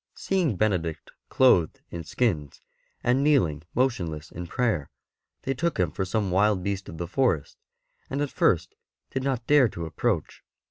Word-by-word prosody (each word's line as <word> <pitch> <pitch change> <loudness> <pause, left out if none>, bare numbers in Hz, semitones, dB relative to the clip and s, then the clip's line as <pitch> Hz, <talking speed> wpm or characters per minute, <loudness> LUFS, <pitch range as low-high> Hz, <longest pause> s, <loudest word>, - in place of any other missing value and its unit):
Seeing 180 - 0
Benedict 90 -6 -1 0.2
clothed 95 -11 +4
in 85 -1 -5
skins, 80 - -1 0.4
and 125 +3 +3
kneeling 105 - +3 0.2
m.otionless 85 - -1
in 90 +1 -6
prayer, 110 - 0 0.5
they 135 - 0
took 170 +5 -1
him 90 -4 +2
for 95 - -2
some 100 0 -1
wild 100 0 +3
beast 100 0 -3
of 80 - -8
the 85 +1 -4
forest, 95 - 0 0.5
and 135 - -2
at 145 -1 -1
first - - +2 0.4
did 130 - -2
not 130 -3 -1
dare 145 -4 +5
to 85 -3 -6
approach. 85 +2 -2
100 Hz, 155 wpm, -26 LUFS, 85-130 Hz, 0.5 s, dare